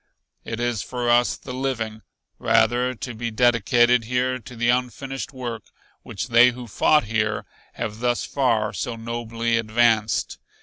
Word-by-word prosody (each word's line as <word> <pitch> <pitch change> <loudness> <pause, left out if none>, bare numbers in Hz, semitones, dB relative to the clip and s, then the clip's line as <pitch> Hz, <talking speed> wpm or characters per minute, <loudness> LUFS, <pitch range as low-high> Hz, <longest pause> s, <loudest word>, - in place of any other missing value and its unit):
It 115 - -5
is 120 -3 -1
for 120 -1 -2
us 120 0 +3
the 125 - -9
living, 115 -5 -3 0.4
rather, 120 +3 +2
to 120 +1 -6
be 115 +1 -4
dedicated 120 +1 +3
here 125 +2 0
to 125 +2 -12
the 120 +1 0
unfinished 130 +3 -2
work 120 -5 -6 0.4
which 100 - -6
they 120 +1 +7
who 125 0 -7
fought 150 +7 +3
here 105 -1 -1 0.3
have 105 0 -5
thus 120 0 0
far 115 -5 0
so 110 +6 -3
nobly 115 0 -2
advanced. 110 -1 +1
120 Hz, 145 wpm, -23 LUFS, 115-125 Hz, 0.4 s, they